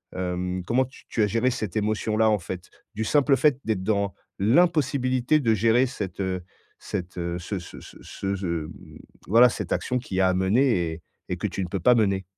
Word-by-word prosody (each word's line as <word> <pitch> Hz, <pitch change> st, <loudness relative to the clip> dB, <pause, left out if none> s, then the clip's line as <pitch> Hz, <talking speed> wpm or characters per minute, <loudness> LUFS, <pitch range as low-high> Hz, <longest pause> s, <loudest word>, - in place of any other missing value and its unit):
hem, 90 Hz, 0 st, -2 dB
comment 130 Hz, +2 st, +2 dB
tu 130 Hz, -, -17 dB
tu 115 Hz, -, -1 dB
as -, -, +3 dB
géré 115 Hz, +4 st, +1 dB
cette 110 Hz, -7 st, -4 dB
émotion-là 110 Hz, +1 st, +1 dB
en 105 Hz, -, +3 dB
fait, 90 Hz, +1 st, -7 dB, 0.3 s
du 110 Hz, -, -2 dB
simple 140 Hz, +3 st, +3 dB
fait 145 Hz, -4 st, +3 dB
d'être 110 Hz, -4 st, -1 dB
dans 100 Hz, -1 st, 0 dB, 0.3 s
l'impossibilité 135 Hz, -, +2 dB
de 115 Hz, -4 st, +3 dB
gérer 115 Hz, +4 st, +3 dB
cette 100 Hz, -9 st, -6 dB
heu 95 Hz, -2 st, -2 dB, 0.4 s
cette 90 Hz, -2 st, -5 dB
heu 85 Hz, 0 st, -2 dB
ce 95 Hz, +3 st, -4 dB
ce 85 Hz, -, -11 dB
ce -, -, -13 dB
ce 100 Hz, 0 st, -4 dB
ce 95 Hz, -, -5 dB
mmh 80 Hz, -2 st, -6 dB, 0.3 s
voilà 120 Hz, +4 st, +7 dB
cette -, -, -3 dB
action 125 Hz, 0 st, -1 dB
qui 95 Hz, -6 st, -6 dB
est -, -, +4 dB
à 95 Hz, 0 st, +3 dB
mener 95 Hz, -1 st, +2 dB
et 80 Hz, -, -10 dB, 0.3 s
et -, -, -1 dB
que -, -, -4 dB
tu 95 Hz, -, -4 dB
ne 90 Hz, -, -4 dB
peux 95 Hz, -, -2 dB
pas 125 Hz, -, +6 dB
mener? 100 Hz, -4 st, +1 dB
105 Hz, 210 wpm, -25 LUFS, 95-125 Hz, 0.4 s, voilà